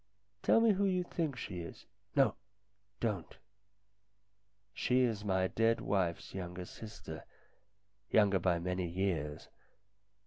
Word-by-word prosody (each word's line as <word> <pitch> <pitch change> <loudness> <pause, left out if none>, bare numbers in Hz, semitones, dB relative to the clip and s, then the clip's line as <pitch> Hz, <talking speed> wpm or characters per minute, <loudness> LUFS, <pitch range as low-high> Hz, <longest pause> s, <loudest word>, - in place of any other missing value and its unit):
"Tell 225 - +5
me 230 -1 +6
who 200 0 +2
you 185 -2 +2
think 160 -5 -2
she 100 -6 -5
is 85 - -8 0.3
no, - - +5 0.7
don't. 105 -8 -2 1.4
She 125 +7 +2
is 115 -5 +1
my 95 -2 +2
dead 115 +3 +2
wife's 95 -4 -1
younger 90 -1 -5
sister, 105 -7 -8 0.9
younger 100 -3 +5
by 90 -1 +2
many 90 +1 -1
years. 85 -5 -2
95 Hz, 115 wpm, -34 LUFS, 90-115 Hz, 1.4 s, me